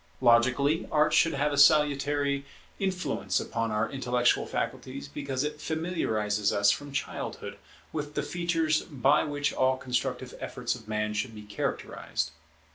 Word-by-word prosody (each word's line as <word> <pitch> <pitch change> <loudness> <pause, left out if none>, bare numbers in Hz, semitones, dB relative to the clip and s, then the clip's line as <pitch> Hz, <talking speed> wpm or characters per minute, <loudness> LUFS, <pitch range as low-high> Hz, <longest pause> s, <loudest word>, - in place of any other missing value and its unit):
Logically, 130 +5 +3
Art 150 0 +3
should 165 - +4
have 145 +1 +1
a 140 - +1
salutary 145 -1 +4 0.4
influence 185 -7 -1
upon 115 0 -2
our 105 +1 0
intellectual 125 -2 +1
faculties, 130 +3 -4
because 140 -2 -3
it 150 0 -4
familiarizes 110 - 0
us 100 0 +4
from 145 0 -4
childhood 140 - -4 0.3
with 150 -1 -4
the 150 - 0
features 165 -2 +1
by 140 0 +2
which 145 -2 -1
all 130 0 +2
constructive 125 -2 -2
efforts - - -3
of - - -10
man 105 0 -1
should 110 +2 -3
be 105 - -9
characterized. 105 -1 -3
140 Hz, 140 wpm, -28 LUFS, 120-150 Hz, 0.4 s, should